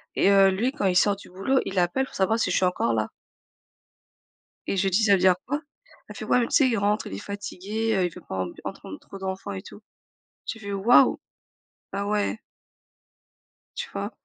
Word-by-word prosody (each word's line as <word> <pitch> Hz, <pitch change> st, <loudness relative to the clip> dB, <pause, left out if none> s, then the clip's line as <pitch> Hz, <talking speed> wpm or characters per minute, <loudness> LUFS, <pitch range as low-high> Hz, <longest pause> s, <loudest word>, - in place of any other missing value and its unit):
et 195 Hz, -, +4 dB
heu, 195 Hz, -1 st, +6 dB
lui 230 Hz, +8 st, 0 dB
quand 280 Hz, -9 st, -2 dB
il 180 Hz, -, +1 dB
sort 205 Hz, +1 st, +4 dB
du 200 Hz, -, -14 dB
boulot, 195 Hz, +9 st, +1 dB
il 190 Hz, -1 st, -1 dB
appelle 180 Hz, +10 st, +1 dB
pour -, -, -14 dB
savoir 200 Hz, +4 st, +2 dB
si 185 Hz, -, +1 dB
je -, -, +2 dB
suis 185 Hz, -, +3 dB
encore 180 Hz, -10 st, +1 dB
là. 110 Hz, -1 st, 0 dB, 1.6 s
Et -, -, 0 dB
je 195 Hz, +1 st, +2 dB
dis: 200 Hz, +4 st, +2 dB
«Ça 205 Hz, -, +5 dB
veut 195 Hz, -, +4 dB
dire 185 Hz, 0 st, +5 dB
quoi?» 290 Hz, +3 st, -1 dB, 0.5 s
elle -, -, -9 dB
fait: -, -, -6 dB
«Ouais -, -, +3 dB
mais 235 Hz, -, 0 dB
tu -, -, -1 dB
sais 265 Hz, -3 st, +4 dB
il 230 Hz, -, +1 dB
rentre, 205 Hz, +2 st, 0 dB
il -, -, -8 dB
est -, -, -6 dB
fatigué, 205 Hz, -, -3 dB
heu, 185 Hz, -2 st, +2 dB
il 175 Hz, -, -2 dB
veut -, -, -11 dB
pas 95 Hz, -, -4 dB
ent 90 Hz, -, -5 dB, 0.2 s
entendre -, -, -7 dB
trop 195 Hz, -, -11 dB
d'enfants 190 Hz, +1 st, -5 dB
et 190 Hz, -, -5 dB
tout». 205 Hz, -, -13 dB, 0.7 s
J'ai 225 Hz, -, -4 dB
fait: 200 Hz, -1 st, -6 dB
«Waouh! 205 Hz, +5 st, +5 dB, 0.7 s
Ah 200 Hz, +1 st, -2 dB
ouais». 210 Hz, +1 st, 0 dB, 1.4 s
Tu -, -, -4 dB
vois? -, -, -3 dB
200 Hz, 220 wpm, -25 LUFS, 190-220 Hz, 1.6 s, heu